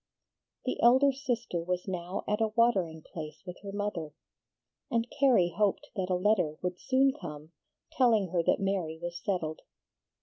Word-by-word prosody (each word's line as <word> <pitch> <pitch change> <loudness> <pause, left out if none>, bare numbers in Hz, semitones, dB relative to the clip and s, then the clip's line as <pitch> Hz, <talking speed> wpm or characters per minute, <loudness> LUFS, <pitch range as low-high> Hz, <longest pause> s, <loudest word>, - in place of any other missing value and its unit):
The 255 - -2
elder 260 +4 +6
sister 245 - -2
was 180 +2 -2
now 180 0 -3
at 210 +2 0
a 220 - +4
watering 200 -8 +1
place 155 -2 -8
with 180 -1 -7
her 200 -1 -7
mother, 195 -7 -3 0.7
and 230 0 0
Carrie 235 -11 +4
hoped 205 0 0
that 190 -2 -2
a 185 - +2
letter 180 -5 +2
would 180 0 -2
soon 265 +1 +3
come 155 - -9 0.4
telling 225 -7 +3
her 175 0 +1
that - - +2
Mary 190 -5 -1
was 175 0 -5
settled. 160 -5 -2
190 Hz, 160 wpm, -30 LUFS, 170-230 Hz, 0.7 s, elder